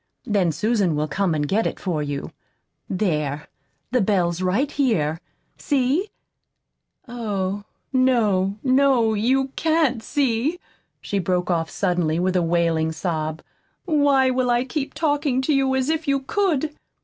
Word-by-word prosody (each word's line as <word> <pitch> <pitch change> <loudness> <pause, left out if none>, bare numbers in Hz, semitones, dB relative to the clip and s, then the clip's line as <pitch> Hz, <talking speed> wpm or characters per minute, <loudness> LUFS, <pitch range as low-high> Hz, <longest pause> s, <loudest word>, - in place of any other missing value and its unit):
Then 195 -5 +1
Susan 195 0 +1
will 150 +1 -1
come 185 +1 0
and 150 -1 -1
get 210 +8 +1
it - - -5
for 170 -5 -2
you. 145 -1 -4 0.6
There, 150 -7 -1 0.4
the 250 -1 +2
bell's 180 -4 +1
right 200 +11 +1
here. 165 - 0 0.4
See? 285 +8 +1 1.0
Oh, 205 -4 -3 0.3
no, 215 -7 +2
no, 260 -4 +3
you 260 +6 +1
CAN'T 310 -5 +1
see!" 275 +6 0 0.4
she 200 - -2
broke 180 0 0
off 165 -2 0
suddenly, 175 -4 0
with 185 +2 0
a 180 - +3
wailing 165 -1 +1
sob. 160 -1 -3 0.4
"Why 285 -5 +3
will 255 -1 0
I 240 0 +2
keep 275 +1 -4
talking 290 -4 +1
to 300 - +1
you 270 -1 +2
as 260 0 0
if 320 0 -1
you 275 -1 +2
could?" 315 -1 0
220 Hz, 140 wpm, -22 LUFS, 175-270 Hz, 1.0 s, no